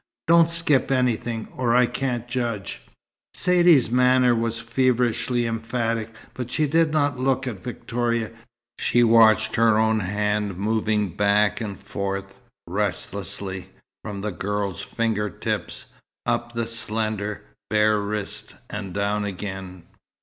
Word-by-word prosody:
Don't 165 0 +5
skip 165 -5 +3
anything, 120 -3 0
or 120 -2 +1
I 125 0 +6
can't 120 -1 -2
judge." 120 -5 -3 0.5
Saidee's 175 - +4
manner 125 0 +4
was 115 0 -1
feverishly 120 0 +1
emphatic, 115 0 -2 0.2
but 125 -1 -5
she 155 - +1
did 160 +2 +2
not 145 -4 +1
look 130 +1 +1
at 115 -7 -4
Victoria. 120 0 -2 0.5
She 120 - +3
watched 115 -1 +5
her 115 -1 +4
own 110 0 +3
hand 105 0 -1
moving 105 0 0
back 105 +4 +2
and 100 -3 -4
forth, 100 -1 -5 0.3
restlessly, 95 0 -4 0.3
from 100 -2 -5
the 105 +1 -2
girl's 100 +1 -3
finger 110 -3 -1
tips, - - -4 0.4
up 120 0 -1
the 115 -1 -1
slender, 110 -2 -2 0.3
bare 105 0 +3
wrist, 105 0 -4 0.2
and 100 -3 -6
down 105 +1 0
again. 95 -2 -6
110 Hz, 125 wpm, -24 LUFS, 105-125 Hz, 0.5 s, I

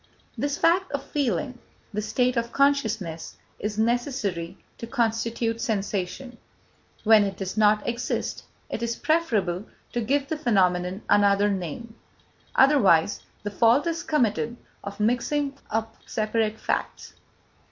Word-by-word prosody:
This 285 0 -1
fact 365 +3 +2
of 280 - -2
feeling, 250 - -2 0.3
this 210 +1 -3
state 250 0 +2
of 235 0 -1
consciousness, 220 - 0 0.2
is 210 0 -3
necessary 225 -7 -1 0.2
to 230 - -6
constitute 230 -1 -1
sensation; 210 +3 -3 0.6
when 220 -1 +6
it 195 -1 -3
does 190 -1 -4
not 210 -1 +3
exist, 240 +1 -2 0.2
it - - -5
is 235 0 -1
preferable 215 - 0 0.3
to 240 - 0
give 275 +5 0
the 315 - -2
phenomenon 185 -7 +1
another 205 0 +4
name, 195 +5 -5 0.6
otherwise 210 - +4 0.2
the 205 - -3
fault 235 +7 +4
is 335 0 -1
committed 235 -6 0 0.3
of 200 +1 -7
mixing 275 +6 0
up 225 +1 -2
separate 220 0 -1
facts. - - -3
225 Hz, 125 wpm, -25 LUFS, 205-255 Hz, 0.6 s, when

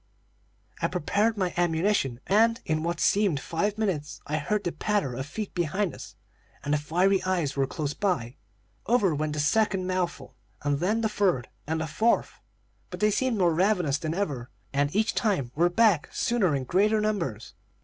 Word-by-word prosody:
"I - - +2
prepared 210 +7 0
my 185 -3 -1
ammunition, 165 - +1
and, 230 +4 +3
in 155 -1 0
what 170 +1 -2
seemed 195 -8 +2
five 200 +9 -2
minutes, 150 -11 -2
I 150 - -1
heard 205 +7 -1
the 175 - -1
patter 205 -12 -1
of 130 +3 -5
feet 205 +6 -5
behind 175 +3 -1
us, - - -10 0.5
and 145 - -1
the 150 - +2
fiery 180 +6 +2
eyes 175 -7 0
were 135 -1 +1
close 145 0 -3
by. 150 - -1 0.5
Over 210 -7 +3
went 150 0 -2
the 150 - -3
second 190 +4 +2
mouthful, 185 -2 -2 0.3
and 145 -1 0
then 210 +7 +1
the 220 - +2
third, 190 - 0 0.2
and 160 +1 -1
the - - -1
fourth; 220 +9 0 0.5
but - - -7
they 210 0 +3
seemed 255 +1 0
more 175 -4 +3
ravenous 175 -5 +2
than 160 0 -3
ever, 140 -11 -3 0.2
and 140 +1 +2
each 215 +2 +2
time 190 - 0
were 170 +3 +3
back 195 -4 +3
sooner 200 -10 +1
in 135 - -2
greater 205 - +2
numbers. 170 - -2
175 Hz, 180 wpm, -27 LUFS, 150-210 Hz, 0.5 s, and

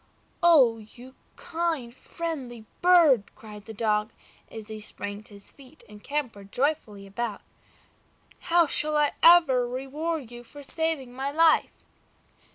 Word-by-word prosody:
"Oh! 275 -10 +5
you 245 +4 -14 0.2
kind, 320 -8 -3
friendly 265 -7 -7 0.2
bird!" 330 - +5
cried 210 -2 -12
the 225 - -9
Dog, 210 0 0 0.4
as 220 -2 -10
he 220 -1 -8
sprang 205 -1 -6
to 215 -1 -13
his 200 - -8
feet 275 +2 -18
and 210 0 -15
capered 235 -9 -5
joyfully 250 -8 -2
about. 205 +1 -5 1.1
"How 340 0 +5
shall 305 0 +2
I 295 -1 +2
ever 325 -8 +6
reward 270 +2 -4
you 240 0 -10
for 285 +4 -13
saving 310 -4 0
my 265 +2 -3
life?" 320 +2 +2
255 Hz, 135 wpm, -26 LUFS, 220-310 Hz, 1.1 s, ever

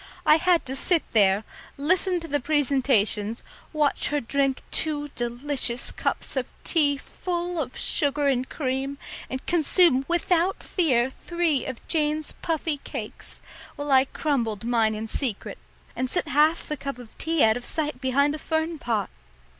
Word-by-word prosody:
I 305 - +7
had 350 0 +2
to 265 - -5
sit 335 +4 +2
there, 200 -1 +4 0.3
listen 355 +5 +1
to 330 - -7
the 290 -2 0
presentations, 250 -7 +1 0.3
watch 300 -3 +1
her 295 0 0
drink 275 +1 0
two 295 -2 0
delicious 245 0 0
cups - - -3
of - - -1 0.2
tea 290 -4 +2
full 350 +2 -3
of 255 -3 -6
sugar 290 -2 +2
and 260 -2 0
cream, 270 0 -2 0.3
and 260 0 -5
consume 335 -4 +3
without 345 +1 +1
fear 265 -8 +1
three 335 -4 -1
of 260 -3 -7
Jane's 305 -1 0
puffy 320 -2 -1
cakes, - - -7 0.3
while 290 0 -4
I 265 0 +6
crumbled 235 -8 -1
mine 225 -2 +2
in 215 +1 -4
secret 225 -1 -3 0.4
and 255 0 -2
set - - -1
half 305 +4 +3
the 300 - -3
cup 275 -1 -5
of 245 -3 -13
tea 325 -1 +2
out 220 0 +5
of 245 - -5
sight 300 -2 -2
behind 280 +2 +2
a 305 - -5
fern 320 0 -2
pot. 220 -7 -1
285 Hz, 155 wpm, -25 LUFS, 250-315 Hz, 0.4 s, I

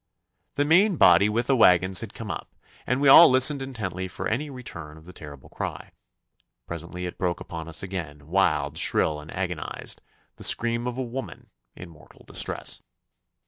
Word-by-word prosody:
The 145 - +1
main 185 +6 +4
body 100 - +5
with 115 +3 -1
the 135 - +2
waggons 95 -4 +4
had 115 - -8
come 110 -3 -6
up, 85 - -8 0.3
and 125 +3 0
we 145 - +3
all 165 +5 +9
listened 130 +2 +4
intently 105 -9 -5
for 90 - -5
any 145 +7 -2
return 85 - -9
of 80 - -16
the 90 - -13
terrible 70 -5 -11
cry. - - -7 0.7
Presently 85 +2 -6
it 90 - -7
broke 90 -2 -1
upon 80 -1 -8
us 85 +1 -1
again, 80 -7 -7
wild, 95 +4 0
shrill, 75 -1 +1
and 75 +1 -12
agonised: 90 -4 -4 0.4
the - - -10
scream 120 +1 +2
of 125 0 -4
a 130 - -2
woman 125 +2 -8 0.3
in 90 - -10
mortal 80 -2 -19
distress. - - -3
95 Hz, 175 wpm, -25 LUFS, 85-125 Hz, 0.7 s, all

